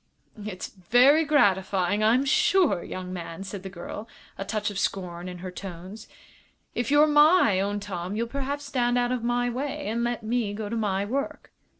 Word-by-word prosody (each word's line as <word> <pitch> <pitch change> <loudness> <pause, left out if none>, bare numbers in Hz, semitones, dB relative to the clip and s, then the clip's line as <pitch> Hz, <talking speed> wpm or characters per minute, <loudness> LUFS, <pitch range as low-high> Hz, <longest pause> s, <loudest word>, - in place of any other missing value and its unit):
"It's 195 -3 -5
very 245 - +4
gratifying, 195 -7 +2
I'm 240 +5 +4
sure, 305 - +3
young 185 0 -6
man," 170 +1 -6
said 195 0 -7
the 190 - -7
girl, 195 +4 -8 0.3
a - - -4
touch 205 +1 -2
of 200 - -4
scorn 180 -3 -3
in 180 - -7
her 185 - -5
tones. 190 +3 -9 0.7
"If 240 -2 -2
you're 290 +1 +6
my 295 - +5
own 205 +1 -1
Tom 190 -1 -5
you'll 230 +2 0
perhaps 280 +3 -4
stand 245 -3 0
out 245 0 +1
of 250 -2 -2
my 240 +1 +1
way 265 +4 -3
and 230 +3 -1
let 240 -1 -2
me 220 -2 -1
go 210 -1 -5
to 230 - -3
my 200 -3 0
work." 270 +6 -4
215 Hz, 185 wpm, -26 LUFS, 190-245 Hz, 0.7 s, you're